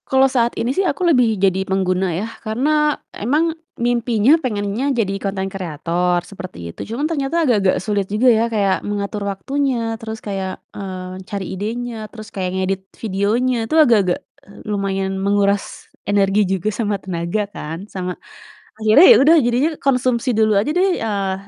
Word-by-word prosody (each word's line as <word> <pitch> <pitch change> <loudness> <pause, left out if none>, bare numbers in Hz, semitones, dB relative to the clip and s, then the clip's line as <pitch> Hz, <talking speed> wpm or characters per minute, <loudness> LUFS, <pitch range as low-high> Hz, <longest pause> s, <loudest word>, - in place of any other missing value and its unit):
Kalo 265 0 +4
saat 245 -3 +1
ini 240 +3 0
sih 380 - +1
aku 370 -1 0
lebih 245 -8 +3
jadi 190 0 +2
pengguna 190 -1 +1
ya, 200 - -2 0.2
karena 295 +7 +1 0.2
emang 305 +9 0 0.2
mimpinya 240 +3 +3
pengennya 215 +2 -1
jadi 200 -4 0
konten 195 -1 -2
kreator, 175 0 -1
seperti 85 - -8
itu. - - -10
Cuma 280 +6 -1
ternyata 325 +2 0
agak-agak 205 -8 +3
sulit 205 -2 0
juga 215 +5 +2
ya 225 -1 +4
kayak 200 -4 +1
mengatur 205 0 -3
waktunya, 240 +2 -1
terus 220 0 -5
kayak, 190 -2 -4 0.2
eee, 185 -1 -6
cari 200 -2 -4
idenya, 220 +2 -4
terus 215 -2 -10
kayak 185 -2 -2
ngedit 190 0 -1 0.2
videonya 220 +5 0
itu - - 0
agak-agak, 225 - +4 0.3
eee, 200 +1 -14
lumayan 195 -2 -2
menguras 200 0 0 0.2
energi 200 0 +2
juga 190 +2 0
sama 210 -1 -1
tenaga 185 +2 -2
kan, 165 -1 -7
sama 185 -3 -5 0.6
akhirnya 220 +11 +7
ya - - +6
udah 325 +4 +6
jadinya 245 +6 +2
konsumsi 255 -1 +1
dulu 220 -1 +3
aja 210 - -1
deh, 365 +4 +2
eee, 200 -3 -1
210 Hz, 155 wpm, -19 LUFS, 195-245 Hz, 0.6 s, akhirnya